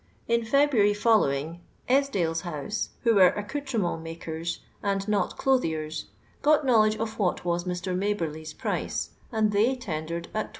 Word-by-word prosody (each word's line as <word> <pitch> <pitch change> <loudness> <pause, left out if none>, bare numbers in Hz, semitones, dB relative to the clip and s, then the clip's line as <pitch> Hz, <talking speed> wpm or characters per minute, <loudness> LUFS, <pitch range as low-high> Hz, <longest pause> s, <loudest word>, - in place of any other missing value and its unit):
In 235 0 +2
February 235 -5 +3
following, 170 -7 +2 0.3
Esdailes' 200 -12 +1
house, 175 +4 -3
who 230 -2 +4
were 190 -3 +7
accoutrement 210 - -2
makers, 165 0 -5 0.2
and 195 0 -1
not 210 -1 0
clothiers, 160 - 0 0.4
got 300 0 +4
knowledge 215 -4 +4
of 220 0 -4
what 180 -3 0
was 175 0 0
Mr. 180 0 -2
Maberly's 165 -6 -2
price, - - -3 0.2
and 220 -2 +2
fAey 240 +6 +2
tendered 170 -5 -4
at 215 - -1
\2s. - - -19
200 Hz, 140 wpm, -27 LUFS, 165-225 Hz, 0.4 s, were